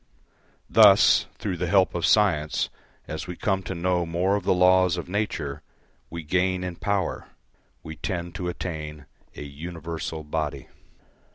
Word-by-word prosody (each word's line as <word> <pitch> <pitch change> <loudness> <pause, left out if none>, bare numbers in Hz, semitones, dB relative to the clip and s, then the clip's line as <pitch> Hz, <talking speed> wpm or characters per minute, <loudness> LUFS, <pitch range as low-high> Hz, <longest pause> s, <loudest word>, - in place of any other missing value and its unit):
Thus, - - +6
through 95 -4 -3
the 90 +1 -2
help 95 +1 +3
of 85 -1 0
science, 80 -8 +2 0.4
as 80 +3 -5
we 90 - -5
come 95 0 0
to 95 0 -5
know 90 +1 0
more 85 +4 0
of 100 - -3
the - - +2
laws 90 -1 +4
of 85 - -5
nature, 80 -8 -3 0.5
we 85 0 -6
gain 90 +3 0
in 90 -2 -5
power; 100 -2 -2 0.6
we 80 -1 -8
tend 85 -3 -4
to 90 -3 -3
attain 75 -4 -6 0.3
a - - -7
universal 80 +2 -6
body. 75 -3 -3
85 Hz, 150 wpm, -25 LUFS, 80-95 Hz, 0.6 s, Thus